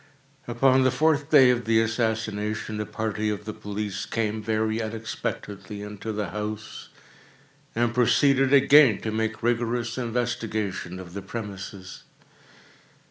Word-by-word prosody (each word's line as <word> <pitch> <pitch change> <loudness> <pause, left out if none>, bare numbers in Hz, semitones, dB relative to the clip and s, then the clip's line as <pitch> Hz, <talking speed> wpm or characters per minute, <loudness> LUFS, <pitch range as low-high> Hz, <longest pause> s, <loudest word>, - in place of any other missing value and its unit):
Upon 130 +2 +3
the 130 - +4
fourth 150 +2 +1
day 135 -5 +7
of 120 -1 -1
the 110 0 +3
assassination, 110 -2 -1
a 105 - -4
party 110 -1 -2
of 105 0 -4
the 110 - -5
police 105 -2 -5
came, 110 -1 -2
very 110 +1 0
unexpectedly, 105 -2 -5
into 105 +1 -6
the 105 -3 -3
house, 105 +2 -6 0.9
and 120 0 +1
proceeded 135 +2 +3
again 140 -4 +6
to 110 - -3
make 110 0 -2
rigorous 120 0 0
investigation 110 -6 -2
of 90 -2 -10
the 100 - -5
premises. 100 -2 -7
110 Hz, 130 wpm, -25 LUFS, 105-120 Hz, 0.9 s, day